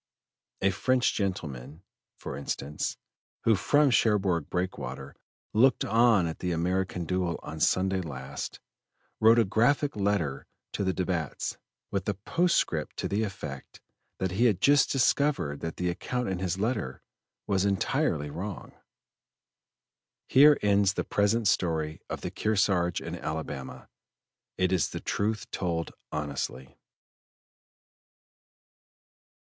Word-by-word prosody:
A 100 - +4
French 125 +6 +2
gentleman, 80 - -4 0.3
for - - -6
instance, 70 +1 -3 0.5
who 115 - +4
from 145 +7 +3
Cherbourg 95 -9 +2
Breakwater 90 +1 -4 0.4
looked 125 +3 +4
on 115 -4 +4
at 80 -1 -4
the 90 - -2
American 90 +1 -1
duel 90 0 -1
on 80 +1 -7
Sunday 95 +3 +2
last, 65 -6 -6 0.6
wrote 110 +2 +6
a 115 - +5
graphic 130 +8 +2
letter 100 -10 -1 0.3
to - - -1
the 95 - +1
Debats, 90 -5 -2 0.3
with 100 0 -1
a 100 - -1
postscript 105 - 0
to - - -2
the 100 +2 0
effect 75 -10 -6 0.4
that 95 -1 -1
he 105 +7 +2
had 105 -7 +3
just 140 +5 +4
discovered 135 - +1
that 80 -1 -5
the 90 0 0
account 125 +7 -3
in 95 -2 -2
his 95 -1 -1
letter 105 - -2 0.4
was 95 -2 +1
entirely 95 -6 0
wrong." 95 +6 -6 1.6
Here 145 +2 +7
ends 100 -1 +3
the - - -1
present 105 +2 +1
story 80 -4 0
of - - -4
the - - -4
Kearsarge 95 -5 +1
and 85 +1 -5
Alabama. 80 -5 -5 0.7
It 90 0 +2
is 90 -5 +2
the - - -5
truth 110 +1 -2
told 85 -2 -2 0.2
honestly. 70 -3 -4
95 Hz, 125 wpm, -28 LUFS, 80-110 Hz, 1.6 s, Here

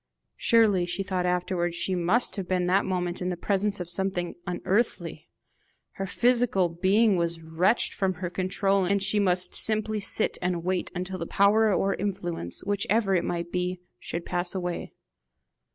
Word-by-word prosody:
Surely, 210 -6 +3
she 195 +2 -3
thought 185 -2 -1
afterwards, 180 -1 -1
she 185 - -1
must 185 +7 +1
have 195 -4 -5
been 180 -1 0
that 190 +3 +2
moment 180 -1 -2
in 180 - -1
the 180 - -3
presence 200 +2 0
of 180 - -5
something 180 -1 -2
unearthly! 190 +6 -2 0.6
Her 195 - -5
physical 235 -5 +2
being 195 +5 +2
was 170 -1 -1
wrenched 175 +8 +1
from 190 -2 -1
her 180 0 -5
control, 195 +1 0
and 200 +1 +1
she 210 +1 +2
must 180 -2 +2
simply 215 0 +2
sit 200 - +1
and 180 -1 -1
wait 185 0 -1
until 185 +1 -4
the 170 - -4
power 210 +2 +3
or 195 +1 +1
influence, 180 - -4
whichever 205 +1 +1
it 175 -2 +2
might 170 0 -3
be, 180 0 -2 0.2
should 170 +6 -5
pass 175 +1 -2
away. 180 -2 -4
185 Hz, 165 wpm, -26 LUFS, 175-200 Hz, 0.6 s, Surely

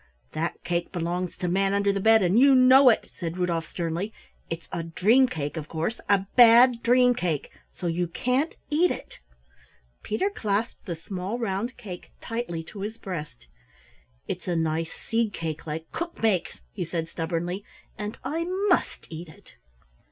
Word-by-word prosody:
"That 165 +2 -3
cake 175 0 -2
belongs 175 0 -3
to 180 - -2
Manunderthebed, 200 +3 +3
and 185 +5 +4
you 275 +1 +7
know 255 +1 +8
it," 225 - +1
said 170 -1 -5
Rudolf 170 -3 -1
sternly. 170 +4 -3 0.4
"It's 165 0 -5
a 170 - -2
dream 210 +10 +4
cake, 150 - -4
of 155 -2 -5
course, 165 +8 -3
a 195 -1 +3
Bad 240 0 +7
dream 250 +1 +5
cake, 175 - -2 0.2
so - - -7
you 175 +1 0
can't 255 - 0 0.2
eat 340 +4 +4
it." - - -6 0.8
Peter 380 - -1
clasped 215 - -2
the 170 - -2
small 185 +6 -4
round 230 +2 -2
cake 195 -7 -9
tightly 225 -8 -4
to 200 +5 -11
his 215 +3 -4
breast. 150 - -7 0.8
"It's - - -5
a 175 - 0
nice 160 0 -1
seed 225 -2 -1
cake 160 -1 -5
like 160 +1 -5
Cook 340 0 -5
makes," 195 - +1
he - - -4
said 165 -1 -3
stubbornly, 175 +4 -3 0.3
"and 210 +1 -5
I 330 +3 -2 0.2
must 355 - +1
eat 165 +1 -7
it." 155 - -17
190 Hz, 160 wpm, -26 LUFS, 165-230 Hz, 0.8 s, know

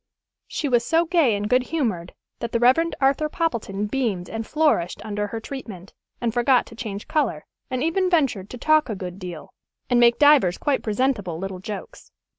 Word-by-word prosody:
She 300 - -3
was 240 -3 +2
so 330 +5 +2
gay 325 - +3
and 205 +1 -2
good 250 +3 +3
humored 230 - -3 0.2
that 235 -1 -5
the 235 - +2
Rev. 265 +8 +4
Arthur 280 +3 +2
Poppleton 230 - -2
beamed 210 -6 -2
and 225 0 -4
flourished 300 - +1
under 210 -1 -2
her 225 +2 -5
treatment, 220 -7 -8 0.3
and 235 -2 -1
forgot 245 +1 +3
to 230 - -13
change 215 -3 -6
color, 250 - -1 0.2
and 255 +1 -2
even 365 +3 +1
ventured 260 - +1
to 250 - -7
talk 310 +1 +3
a 215 - -2
good 185 0 -7
deal, 175 -5 -8 0.4
and 245 - +4
make 235 0 +5
divers 290 -12 +5
quite 285 -2 0
presentable 210 -6 -1
little 190 +1 -5
jokes. 200 +2 -8
235 Hz, 185 wpm, -23 LUFS, 200-285 Hz, 0.4 s, make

